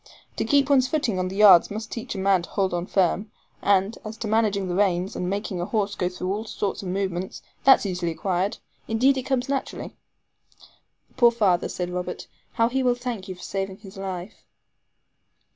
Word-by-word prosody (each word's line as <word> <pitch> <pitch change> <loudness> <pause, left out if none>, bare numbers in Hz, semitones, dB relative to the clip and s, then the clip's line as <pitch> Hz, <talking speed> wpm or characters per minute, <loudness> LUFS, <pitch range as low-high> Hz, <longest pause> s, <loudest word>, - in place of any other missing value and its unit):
To - - 0
keep 280 -2 +3
one's 270 -3 +4
footing 250 -11 0
on 185 - 0
the 190 - -6
yards 200 -4 +7
must 215 +2 -6
teach 230 -1 -5
a - - -4
man 190 -1 +3
to 170 - -10
hold 190 -3 0
on 175 +1 -2
firm; 195 +2 +1 0.3
and 200 +2 +2
as 215 +1 -7
to 220 - -4
managing 210 -3 +1
the 180 - -2
reins, 185 -1 +1
and 180 - -2
making 200 -2 -3
a - - -1
horse 205 -1 0
go 180 -2 -1
through 185 +1 -3
all 215 +2 -4
sorts 205 -2 -3
of 195 - -6
movements, 185 -1 -3 0.2
that's 270 -5 +7
easily 180 -3 -2
acquired. 185 +3 -1 0.3
Indeed, 255 +5 +3
it - - 0
comes 260 -1 0
naturally." 275 -1 -4 1.2
"Poor 240 -1 +7
father," 205 -7 +1
said 180 -1 -4
Robert; 180 0 -4 0.3
"how 230 -2 +3
he 265 +3 0
will 250 -1 +2
thank 240 -6 -5
you 185 - -6
for 180 - -13
saving 195 -1 -3
his 200 -1 -13
life." 190 -1 -6
200 Hz, 195 wpm, -25 LUFS, 185-225 Hz, 1.2 s, yards